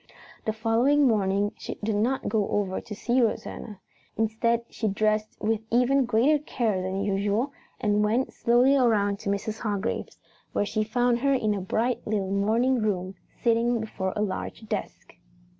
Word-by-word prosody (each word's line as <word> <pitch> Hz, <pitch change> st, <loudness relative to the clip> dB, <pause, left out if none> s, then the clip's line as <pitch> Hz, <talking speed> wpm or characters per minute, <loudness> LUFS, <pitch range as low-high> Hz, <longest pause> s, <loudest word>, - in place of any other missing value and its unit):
The 220 Hz, -, +1 dB
following 235 Hz, +6 st, +3 dB
morning 205 Hz, -2 st, +1 dB
she -, -, -5 dB
did 215 Hz, 0 st, 0 dB
not 245 Hz, +6 st, 0 dB
go 215 Hz, -3 st, +1 dB
over 195 Hz, -2 st, -1 dB
to 210 Hz, -, -8 dB
see 245 Hz, +4 st, +1 dB
Rosanna. 215 Hz, -2 st, -2 dB, 0.4 s
Instead 225 Hz, +2 st, +1 dB
she 225 Hz, -, -3 dB
dressed 215 Hz, +1 st, 0 dB
with 220 Hz, 0 st, 0 dB
even 250 Hz, +3 st, +3 dB
greater 245 Hz, +6 st, +3 dB
care 220 Hz, -10 st, -1 dB
than 190 Hz, +2 st, -2 dB
usual 205 Hz, +7 st, 0 dB, 0.3 s
and 210 Hz, -1 st, +2 dB
went 230 Hz, +5 st, +1 dB
slowly 245 Hz, +4 st, +4 dB
around 210 Hz, -6 st, +2 dB
to -, -, -4 dB
Mrs. 205 Hz, +2 st, -2 dB
Hargrave's, 210 Hz, -1 st, -3 dB, 0.4 s
where 205 Hz, -, +1 dB
she 215 Hz, +1 st, -1 dB
found 240 Hz, +2 st, +1 dB
her 275 Hz, +2 st, +2 dB
in 215 Hz, -5 st, +1 dB
a 200 Hz, -, -3 dB
bright 230 Hz, +6 st, 0 dB
little 200 Hz, -3 st, -1 dB
morning 225 Hz, +6 st, +2 dB
room, 190 Hz, -3 st, -1 dB, 0.3 s
sitting 235 Hz, 0 st, +2 dB
before 195 Hz, -4 st, -3 dB
a 210 Hz, -, 0 dB
large 210 Hz, +2 st, -4 dB
desk. 210 Hz, -2 st, -5 dB
220 Hz, 160 wpm, -26 LUFS, 205-240 Hz, 0.4 s, slowly